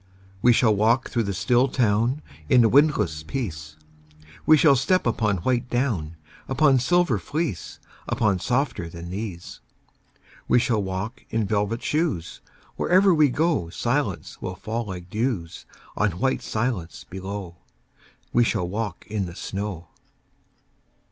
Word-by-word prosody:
We 125 - +6
shall 115 -2 +4
walk 115 +5 +2
through 120 - +1
the 100 - -2
still 125 +5 +3
town 120 +3 +1 0.3
In 125 -2 +6
a 115 - +4
windless 105 - +3
peace; 75 - -5 0.7
We 155 - +8
shall 145 -2 +6
step 185 +8 +2
upon 110 -4 +1
white 125 -1 +1
down, 110 - -1 0.3
Upon 135 0 +4
silver 160 - +2
fleece, 150 - -3 0.3
Upon 105 -4 +1
softer 120 - -1
than 85 +1 -8
these. 95 -3 -6 0.9
We - - +4
shall 115 -3 +2
walk 95 +5 -4
in 110 -1 0
velvet 105 +3 -1
shoes: 150 - -1 0.4
Wherever 185 +1 +4
we 155 -3 +4
go 150 - 0
Silence - - -2
will 95 - -4
fall 115 +5 -4
like 90 -3 -7
dews 105 -5 -3 0.3
On 105 -4 +1
white 130 +9 0
silence 110 -7 -3
below. 95 -2 -6 0.8
We 120 - +5
shall 90 -6 0
walk 100 0 -4
in 105 -3 -2
the 85 - -9
snow. 95 -5 -5
110 Hz, 135 wpm, -24 LUFS, 95-130 Hz, 0.9 s, We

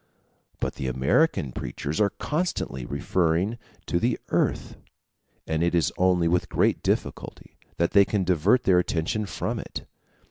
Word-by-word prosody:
But - - -2
the 65 - -3
American 65 - +1
preachers 70 - -4
are 100 - +4
constantly 150 - -3
referring 85 +8 0 0.3
to 85 - 0
the 120 +5 +1
earth; - - 0 0.7
and 80 0 -1
it 85 +1 +2
is 85 -3 +2
only 90 -2 +3
with 90 +1 +1
great - - +1
difficulty - - -3 0.2
that 85 - +1
they 100 - +7
can 100 -1 0
divert 90 +7 +3
their 90 -2 +4
attention 90 +5 -1
from - - -3
it. - - -7
90 Hz, 145 wpm, -25 LUFS, 80-100 Hz, 0.7 s, they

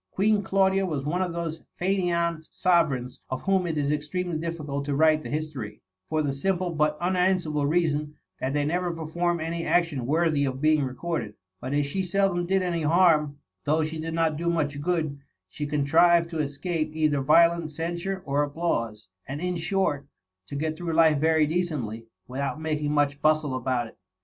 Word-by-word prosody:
Queen 210 +1 +2
Claudia 195 0 +2
was 150 -7 -2
one 175 +5 0
of 180 -2 -1
those 165 -1 -4 0.2
faineant 170 -3 0
sovereigns 140 -9 +1
of 130 - -4
whom 190 -2 +2
it 160 -2 -2
is 145 -1 +1
extremely 160 +4 -2
difficult 155 -3 -3
to 140 0 -2
write 155 +1 +4
the - - -7
history, 145 -9 -4 0.3
for 155 -1 +1
the 140 -2 -1
simple 180 +5 -1
but 150 -1 0
unan 185 +2 +2
swerable 150 -5 -1
reason^ 155 -3 0 0.3
that 130 - -1
they 145 0 0
never 175 +3 0
perform 170 +1 -1
any 165 +1 -3
action 165 -9 +1
worthy 155 -1 +2
of 130 -1 -2
being 155 +1 +3
recorded. 130 -2 -3 0.2
But 130 +6 -3
as 145 0 +2
she 165 +7 -2
seldom 185 -1 +1
did 190 0 +2
any 170 -2 -1
harm, 155 -3 +3 0.3
though 155 +2 +2
she 160 +1 -4
did 165 +1 -4
not 165 -2 +1
do 170 +2 -1
much 145 -4 -1
good, 155 -4 -1 0.3
she 145 +10 -5
contrived 165 +4 +3
to 165 - -3
escape 155 +2 -2
either 155 -3 +2
violent 170 +3 +4
censure 175 +4 -3
or 140 +1 +1
applause; 140 - -2 0.2
and 135 +2 -4
in 180 +1 -2
short, 165 -5 -1 0.4
to 140 - -7
get 155 +2 -2
through 170 -1 -3
life 160 -2 +5
very 160 0 +3
decently, 145 -10 -2 0.2
without 140 +4 -3
making 150 -2 -1
much 145 -1 +1
bjistle 155 -3 +2
about 130 -1 -1
it. 110 - -14
155 Hz, 180 wpm, -26 LUFS, 145-170 Hz, 0.4 s, life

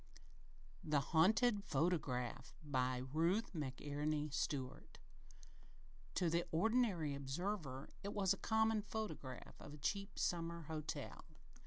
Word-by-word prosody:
The 150 -2 +3
Haunted 200 - +4
Photograph 135 -7 0
BY 130 -3 +1
RUTH 180 +9 +2
McENERY 150 0 -2
STUART 145 -5 -2 1.2
To 180 - +3
the 170 +1 +2
ordinary 195 - +2
observer 140 0 -3
it 200 - -3
was 195 -3 +2
just 195 - +2
a - - -5
common 220 -1 +4
photograph 200 - -5
of 145 - -8
a - - -11
cheap 200 +7 -2
summer 170 -1 0
hotel. 155 0 -4
160 Hz, 115 wpm, -40 LUFS, 145-200 Hz, 1.2 s, Haunted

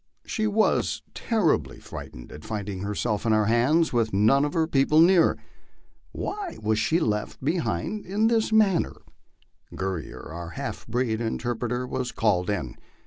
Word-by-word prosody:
She 215 -1 -1
was 215 +1 +1
terri 210 - +2
bly 65 - -12
frightened - - -10
at 75 - -10
finding 105 -3 -4
herself 105 +1 -2
in 115 -1 +2
our 110 -1 +3
hands, 130 +10 +3
with 115 -2 +1
none 115 +8 +4
of 145 - -3
her 165 -1 +3
people 150 0 +3
near. 170 0 +5 0.7
Why 400 -3 -5
was 110 0 0
she 165 +8 +2
left 105 +2 -2
behind 170 - -1
in 205 +4 +1
this 225 -1 +2
manner? 210 -5 +3 0.8
Guerrier, 95 -4 -4
our 85 0 -6
half - - -5
breed 115 -1 -1
interpret 120 +1 -2
er, 125 +1 -1
was 125 0 -3
called 95 -5 +1
in. 85 -12 -3
120 Hz, 155 wpm, -26 LUFS, 105-170 Hz, 0.8 s, near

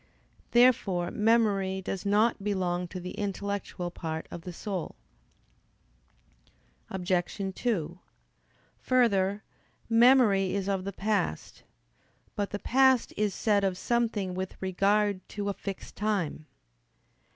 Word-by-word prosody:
Therefore 220 -8 +3
memory 210 -4 +2
does 190 +1 -4
not 210 +1 +2
belong 180 -3 -1
to 185 - -7
the 180 +1 -6
intellectual 200 -3 -4
part 160 -2 -5
of 170 - -7
the 180 - -7
soul. 185 0 -5 1.9
Obj. 185 -1 -2 0.4
2: 180 -8 -2 0.8
Further, 205 -5 +2 0.4
memory 230 -5 +5
is 200 -1 -2
of 195 -2 -1
the 200 - -3
past. 200 - -2 0.7
But 205 -1 -1
the 205 - -3
past 260 +2 +3
is 210 -1 0
said 205 -2 +2
of 190 -2 0
something 225 -5 0
with 185 +1 -5
regard 195 +1 +1
to 205 -1 -3
a - - -1
fixed 195 0 -7
time. 195 -7 -2
200 Hz, 115 wpm, -28 LUFS, 185-215 Hz, 1.9 s, memory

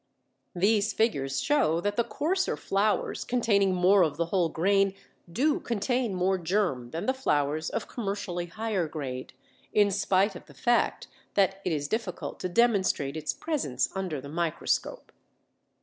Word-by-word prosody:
These 205 +3 +2
figures 140 - 0
show 270 - +2
that 205 +3 -1
the 235 - +2
coarser 310 - -1
flours 205 +2 0
containing 200 -6 +2
more 185 +2 +5
of 155 -4 +1
the 170 - +1
whole 170 -1 +1
grain 195 +4 +2 0.4
do 290 - +2
contain 235 -1 -1
more 185 +1 +1
germ 170 -9 0
than 165 +6 -4
the 260 - +2
flours 155 - 0
of - - -3
commercially 195 -6 -3
higher 205 -2 -2
grade, 135 -5 -6 0.4
in 205 -1 +4
spite 195 +1 +2
of - - -11
the - - -16
fact 240 0 +1 0.3
that 195 -1 +2
it 180 - -1
is 145 -2 -1
difficult 220 -2 -4
to 185 - -3
demonstrate 190 - +2
its 155 -1 -2
presence 140 - -1
under 185 -6 -3
the 140 - -9
microscope. 165 +1 -2
190 Hz, 150 wpm, -28 LUFS, 165-220 Hz, 0.4 s, more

